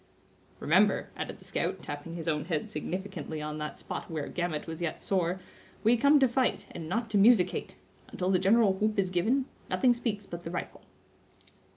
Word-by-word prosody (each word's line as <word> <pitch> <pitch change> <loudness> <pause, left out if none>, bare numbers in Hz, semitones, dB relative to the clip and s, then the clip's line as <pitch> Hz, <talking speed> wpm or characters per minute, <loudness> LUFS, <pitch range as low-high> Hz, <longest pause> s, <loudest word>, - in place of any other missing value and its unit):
"Remember," - - +3
added - - -5
the - - -13
scout, - - -2
tapping 145 +3 -6
his 165 -1 -5
own 150 -2 0
head 160 -4 -1
significantly 175 -1 -5
on 150 0 -4
that 150 0 -5
spot - - -6
where 155 -3 -3
Gamut 175 -4 -2
was 165 +1 -6
yet 170 -2 -2
sore, 185 -1 0 0.4
"we 225 +2 +5
come 280 +5 +5
to 265 - +6
fight, 250 +1 0
and 160 -1 -7
not 225 +5 -1
to 205 - +3
musickate. 205 -3 +4 0.4
Until 185 +1 -1
the 185 - +4
general 200 +2 +4
whoop 215 +3 0
is 190 -2 +1
given, 230 +10 +2 0.2
nothing 250 -2 +4
speaks 225 -4 -3
but 170 0 -7
the 165 - -5
rifle." 175 - -5
185 Hz, 185 wpm, -30 LUFS, 165-220 Hz, 0.4 s, to